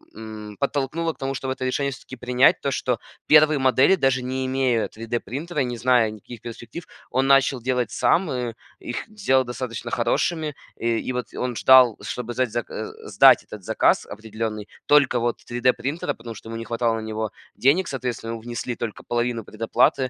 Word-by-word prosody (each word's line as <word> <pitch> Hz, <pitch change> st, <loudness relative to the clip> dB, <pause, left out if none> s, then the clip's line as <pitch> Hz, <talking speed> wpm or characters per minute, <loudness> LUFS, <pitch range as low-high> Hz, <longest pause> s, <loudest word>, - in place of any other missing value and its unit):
м, 110 Hz, -1 st, -9 dB
подтолкнуло 145 Hz, +4 st, -1 dB
к -, -, -28 dB
тому, 135 Hz, -1 st, -2 dB
чтобы 130 Hz, 0 st, -2 dB
это 130 Hz, -, -7 dB
решение 140 Hz, +2 st, 0 dB
всё-таки 130 Hz, 0 st, -10 dB
принять. 125 Hz, +2 st, +3 dB
То, 140 Hz, -, -1 dB
что 125 Hz, -2 st, -1 dB, 0.3 s
первые 150 Hz, -1 st, +6 dB
модели, 130 Hz, +7 st, +4 dB
даже 130 Hz, -5 st, +1 dB
не 130 Hz, +1 st, -2 dB
имея 130 Hz, -4 st, +1 dB
3D-принтера, 125 Hz, +8 st, -4 dB
не 120 Hz, -1 st, -4 dB
зная 120 Hz, -2 st, +3 dB
никаких 110 Hz, +2 st, -11 dB
перспектив, 120 Hz, +8 st, -8 dB, 0.3 s
он 130 Hz, +2 st, +1 dB
начал 135 Hz, -2 st, +4 dB
делать 125 Hz, -2 st, -1 dB
сам, 175 Hz, +7 st, +2 dB
и 125 Hz, -2 st, -2 dB, 0.3 s
их 120 Hz, -, -5 dB
сделал 195 Hz, -12 st, +1 dB
достаточно 120 Hz, -1 st, -5 dB
хорошими. 155 Hz, +6 st, 0 dB, 0.2 s
И, 115 Hz, -1 st, 0 dB
и, -, -, -1 dB
вот, 125 Hz, 0 st, -3 dB
он 125 Hz, -1 st, -2 dB
ждал, 130 Hz, -2 st, +6 dB
чтобы 120 Hz, -1 st, -5 dB
сдать, 125 Hz, -2 st, -1 dB
э, 120 Hz, -, -4 dB, 0.2 s
сдать -, -, +6 dB
этот 105 Hz, -3 st, -10 dB
заказ -, -, +2 dB
определенный 110 Hz, -1 st, -5 dB, 0.2 s
только, 145 Hz, -4 st, +4 dB
вот, 120 Hz, 0 st, 0 dB
3D-принтера, 130 Hz, +6 st, 0 dB
потому 115 Hz, 0 st, -9 dB
что 110 Hz, -, -11 dB
ему 115 Hz, -, -5 dB
не 115 Hz, -, -6 dB
хватало 115 Hz, -1 st, 0 dB
на 110 Hz, -, -4 dB
него 110 Hz, 0 st, -3 dB, 0.2 s
денег, 155 Hz, +8 st, +3 dB
соответственно, 120 Hz, -3 st, -4 dB
внесли 120 Hz, +1 st, -4 dB
только 115 Hz, -3 st, -5 dB
половину 120 Hz, -1 st, -1 dB
предоплаты. 125 Hz, +5 st, +1 dB
125 Hz, 175 wpm, -23 LUFS, 115-135 Hz, 0.3 s, первые